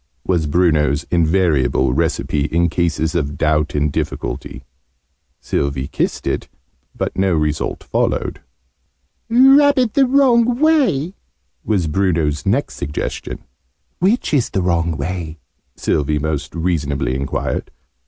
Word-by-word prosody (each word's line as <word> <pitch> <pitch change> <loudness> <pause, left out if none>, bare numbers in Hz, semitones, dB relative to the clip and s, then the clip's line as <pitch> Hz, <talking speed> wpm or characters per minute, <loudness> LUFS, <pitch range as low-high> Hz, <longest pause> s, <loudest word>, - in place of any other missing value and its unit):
was 85 -4 0
Bruno's 75 -2 +2
invariable 80 -6 +2
recipe 75 -1 0
in 85 +2 +1
cases 85 -1 -1
of 75 -4 -2
doubt 75 -1 +1
and 75 0 +1
difficulty. 70 - -4 0.7
Sylvie 70 -1 -2
kissed - - -2
it, - - -2 0.5
but - - -3
no 95 -2 +1
result 75 -1 -2
followed. - - -1 0.9
"Rub 270 +4 +6
it 245 -4 +2
the 270 -2 +4
wrong 245 -3 +3
way," 270 - +2 0.5
was 100 -6 0
Bruno's 80 -2 0
next 125 +9 0
suggestion. 75 +1 -5 0.6
"Which 195 +1 +1
is 130 -5 +2
the 95 - -1
wrong 85 -3 0
way?", 80 +1 -4 0.4
Sylvie 75 0 0
most 75 0 -3
reasonably 75 -6 -1
enquired. 65 +1 -3
85 Hz, 115 wpm, -18 LUFS, -, 0.9 s, Rub